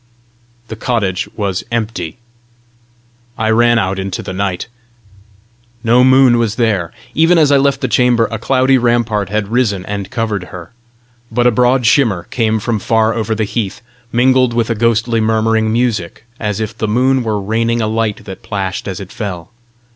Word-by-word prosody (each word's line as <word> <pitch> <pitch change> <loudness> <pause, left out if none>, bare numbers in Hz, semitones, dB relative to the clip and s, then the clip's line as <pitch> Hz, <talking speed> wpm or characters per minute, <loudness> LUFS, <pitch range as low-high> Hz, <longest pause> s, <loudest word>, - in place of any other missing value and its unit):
The 110 - -5
cottage 105 -5 -2
was 100 -4 -2
empty. 115 -5 -3 1.2
I 110 0 0
ran 120 +1 +4
out 95 -2 -1
into 95 -1 -4
the 95 - -6
night. 95 -2 -2 1.2
No 120 +2 +4
moon 130 -2 +5
was 115 -2 0
there! 105 -8 0 0.2
Even 165 +3 +4
as 150 -3 +4
I 140 - +5
left 140 0 +1
the 130 - 0
chamber, 120 -1 +2
a 115 - -3
cloudy 130 +2 +2
rampart 120 -4 0
had 105 -1 -2
risen 110 -6 0
and 100 -1 -5
covered 110 -5 -2
her. 90 -2 -10 0.6
But 120 +2 +1
a 125 - +5
broad 125 +2 +2
shimmer 115 - +3
came 110 -2 +1
from 110 0 -2
far 110 +1 +1
over 110 -1 -2
the 110 - -1
heath, 105 0 -3 0.3
mingled 130 0 +3
with 115 -1 0
a - - 0
ghostly 115 +1 +1
murmuring 110 0 +1
music, 110 -6 -1 0.2
as 105 -2 -2
if 110 0 -4
the 110 - -2
moon 130 +4 +2
were 110 -3 -1
raining 115 +3 0
a 110 - 0
light 110 -1 -2
that 95 -2 -9
plashed 95 -2 -4
as 95 -2 -4
it 100 0 -9
fell. 95 -3 -6
110 Hz, 170 wpm, -15 LUFS, 105-120 Hz, 1.2 s, moon